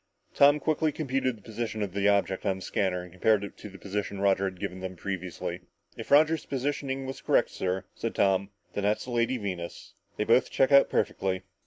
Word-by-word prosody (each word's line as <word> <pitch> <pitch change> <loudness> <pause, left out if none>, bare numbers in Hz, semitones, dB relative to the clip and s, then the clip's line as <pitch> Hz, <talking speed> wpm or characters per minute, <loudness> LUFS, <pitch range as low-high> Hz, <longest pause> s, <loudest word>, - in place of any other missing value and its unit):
Tom 145 +1 +6
quickly 155 0 +1
computed 135 -4 -1
the 105 - -20
position 110 -1 -3
of 95 -3 -4
the 100 0 +1
object 100 -2 +2
on 95 -2 +1
the 95 - -10
scanner 90 -2 -1
and 90 - -12
compared 100 +3 +2
it 100 - -7
to 105 - -9
the 95 - -12
position 100 0 -4
Roger 100 -1 +2
had 95 -2 -4
given 90 +1 -4
them 95 0 -5
previously. 95 -1 -5 0.3
"If - - -8
Roger's 155 +2 +5
positioning 135 0 -2
was 135 0 -6
correct, - - +2
sir," 95 0 -2
said - - -4
Tom, 95 0 +2 0.2
"then 100 - -2
that's 105 +1 +1
the 125 - -7
Lady 120 +2 +1
Venus. 90 -6 -6 0.2
They - - +1
both - - +3
check 135 +1 +2
out 140 0 +7
perfectly!" 95 -1 -1
100 Hz, 205 wpm, -28 LUFS, 95-130 Hz, 0.3 s, out